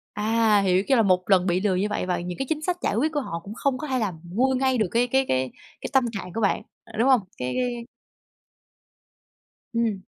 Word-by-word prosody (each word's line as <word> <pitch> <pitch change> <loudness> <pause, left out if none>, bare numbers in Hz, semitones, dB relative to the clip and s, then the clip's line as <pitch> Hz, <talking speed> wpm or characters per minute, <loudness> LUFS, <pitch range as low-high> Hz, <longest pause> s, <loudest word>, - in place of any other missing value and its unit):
À, 215 0 +3
hiểu, 190 -1 +2
kiểu 270 - +4
là, 225 - +5
một 185 -2 +3
lần 185 -2 +4
bị 180 0 +1
lừa 200 -2 +1
như 195 +3 +1
vậy - - -2
và 180 -1 -1
những 175 0 -5
cái 270 - -2
chính 310 -1 -1
sách 355 +2 -1
giải - - 0
quyết 300 +7 +1
của 295 - +1
họ 170 -9 -5
cũng 205 - -8
không 275 0 0
có 305 - -5
thể 260 -1 0
làm 190 -7 -2
nguôi 245 +10 +1
ngay 260 0 +1
được 215 -5 +1
cái 240 +2 +2
cái 265 +2 +2
cái 130 0 0 0.3
cái - - -4
tâm 265 -2 +4
trạng 190 -5 -6
của 225 - -2
bạn, 200 - +1 0.4
đúng 235 +4 +3
hông? 260 - +6 0.2
Cái 125 0 -3
cái 240 -2 -2 1.9
Ừm. 225 -4 0
220 Hz, 235 wpm, -25 LUFS, 185-255 Hz, 1.9 s, hông